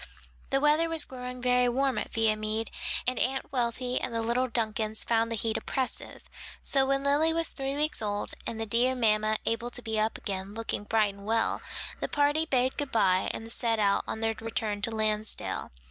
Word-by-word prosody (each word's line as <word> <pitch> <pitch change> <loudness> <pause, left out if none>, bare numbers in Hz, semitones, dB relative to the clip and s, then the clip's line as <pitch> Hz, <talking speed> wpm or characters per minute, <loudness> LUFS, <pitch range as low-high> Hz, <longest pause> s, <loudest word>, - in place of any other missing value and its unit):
The 270 - +2
weather 300 +3 +3
was 325 -2 +2
growing 250 -1 -7
very 250 0 +4
warm 260 -1 +1
at - - -5
Viamede 220 0 0 0.3
and 255 0 0
Aunt 265 +1 0
Wealthy 250 0 -1
and 235 - -3
the 230 - 0
little 245 +3 +1
Duncans 220 -2 -1
found 230 0 +1
the - - +1
heat 225 0 0
oppressive; 260 +2 -3 0.4
so 270 -1 +2
when 275 0 +1
Lily 290 +3 +4
was 330 -1 0
three 270 0 -3
weeks 300 -2 +1
old 205 -1 -2 0.2
and 225 - -4
the 225 - -1
dear 240 +4 +2
mamma 215 -2 +2
able 230 +1 -1
to 245 - -4
be 220 -1 -1
up 220 +1 0
again, 195 0 -4
looking 225 -2 -3
bright 215 -2 +2
and 200 +1 -12
well, 225 0 +1 0.4
that - - -3
party 290 +2 +2
bade 260 -2 +1
good 285 -2 -2
bye 190 -4 +3
and 225 +1 -6
set 230 -1 0
out 200 -2 +2
on 220 - -4
their 225 0 +1
return 220 -2 -2
to 230 - 0
Lansdale. 215 -1 0
230 Hz, 195 wpm, -29 LUFS, 220-260 Hz, 0.4 s, very